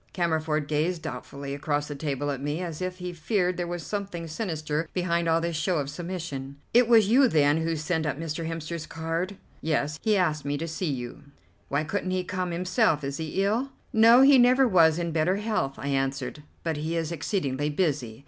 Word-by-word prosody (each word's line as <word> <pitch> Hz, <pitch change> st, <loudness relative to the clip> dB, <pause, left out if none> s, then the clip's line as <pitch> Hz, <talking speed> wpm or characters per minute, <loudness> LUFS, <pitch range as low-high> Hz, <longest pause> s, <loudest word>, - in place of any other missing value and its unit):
Cammerford 160 Hz, -4 st, 0 dB
gazed 160 Hz, +3 st, 0 dB
doubtfully 140 Hz, 0 st, -6 dB
across 145 Hz, +1 st, -1 dB
the 145 Hz, -, -5 dB
table 145 Hz, -1 st, -2 dB
at 135 Hz, -2 st, -4 dB
me, 145 Hz, +3 st, -2 dB
as 170 Hz, -2 st, -5 dB
if 185 Hz, 0 st, -3 dB
he 180 Hz, -1 st, -5 dB
feared 180 Hz, +2 st, 0 dB
there 175 Hz, 0 st, -3 dB
was 175 Hz, -3 st, -5 dB
something 195 Hz, -3 st, -4 dB
sinister 155 Hz, -3 st, -3 dB
behind 170 Hz, -2 st, 0 dB
all 165 Hz, 0 st, +4 dB
this 170 Hz, 0 st, -2 dB
show 170 Hz, +3 st, 0 dB
of 140 Hz, -1 st, -2 dB
submission. 160 Hz, -5 st, -5 dB, 0.2 s
"It 240 Hz, 0 st, +6 dB
was 225 Hz, -4 st, +6 dB
you, 260 Hz, +3 st, +6 dB
then, 150 Hz, -6 st, +3 dB
who 165 Hz, 0 st, 0 dB
sent 160 Hz, +1 st, -1 dB
up 145 Hz, -, -2 dB
Mr. 165 Hz, 0 st, -3 dB
Hemster's 165 Hz, 0 st, -5 dB
card?" 165 Hz, +4 st, -3 dB, 0.2 s
"Yes. 150 Hz, -1 st, -1 dB
He 215 Hz, -2 st, +2 dB
asked 155 Hz, -5 st, +1 dB
me 145 Hz, +1 st, -1 dB
to 165 Hz, +3 st, -4 dB
see 165 Hz, +1 st, -2 dB
you." 130 Hz, +2 st, -5 dB, 0.4 s
"Why 140 Hz, +2 st, +1 dB
couldn't 185 Hz, +4 st, -2 dB
he 185 Hz, 0 st, 0 dB
come 180 Hz, 0 st, -3 dB
himself? 180 Hz, -1 st, +1 dB
Is 140 Hz, 0 st, -3 dB
he 160 Hz, +4 st, -1 dB
ill?" 230 Hz, +7 st, 0 dB, 0.2 s
"No, 230 Hz, +3 st, +7 dB
he 275 Hz, -1 st, +7 dB
never 255 Hz, +2 st, +5 dB
was 165 Hz, -6 st, +5 dB
in 170 Hz, -1 st, -2 dB
better 160 Hz, +4 st, +2 dB
health," 210 Hz, -10 st, -1 dB
I 140 Hz, -, -4 dB
answered; 135 Hz, +1 st, -2 dB, 0.2 s
"but 160 Hz, -2 st, -1 dB
he 160 Hz, +3 st, -2 dB
is 165 Hz, 0 st, -2 dB
exceedingly 150 Hz, -4 st, -1 dB
busy. 145 Hz, -9 st, -1 dB
165 Hz, 200 wpm, -27 LUFS, 150-185 Hz, 0.4 s, No